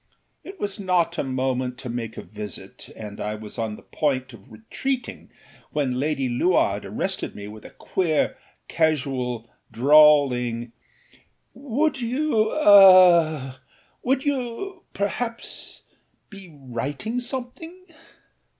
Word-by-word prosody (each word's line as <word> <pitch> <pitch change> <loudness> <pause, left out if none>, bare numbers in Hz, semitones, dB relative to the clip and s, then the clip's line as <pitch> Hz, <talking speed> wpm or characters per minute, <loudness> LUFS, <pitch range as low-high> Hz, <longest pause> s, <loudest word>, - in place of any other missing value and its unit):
It 385 +1 -11
was 205 +1 -4
not 180 -3 0
a - - +1
moment 130 -1 -2
to 130 - -8
make 115 -2 -5
a - - -6
visit, 105 -3 -9
and 105 -2 -8
I 105 +1 -3
was 110 +2 -9
on 110 -2 -2
the - - -15
point 130 -4 -2
of 100 -4 -16
retreating 255 +3 -5 0.4
when 130 -4 -1
Lady 140 -2 -1
Luard 145 +9 +1
arrested - - -3
me 100 0 -8
with 105 0 -11
a - - -9
queer, 165 -5 0 0.3
casual, 130 -7 -1 0.2
drawling 125 -3 +4 0.8
âWould 275 +3 -1 2.1
youâaâwould 265 +2 +1
you, 285 +7 -3
perhaps, 230 +3 -4 0.5
be 195 -3 -12
writing 140 - -4
something? 260 +8 -6
145 Hz, 110 wpm, -24 LUFS, -, 2.1 s, drawling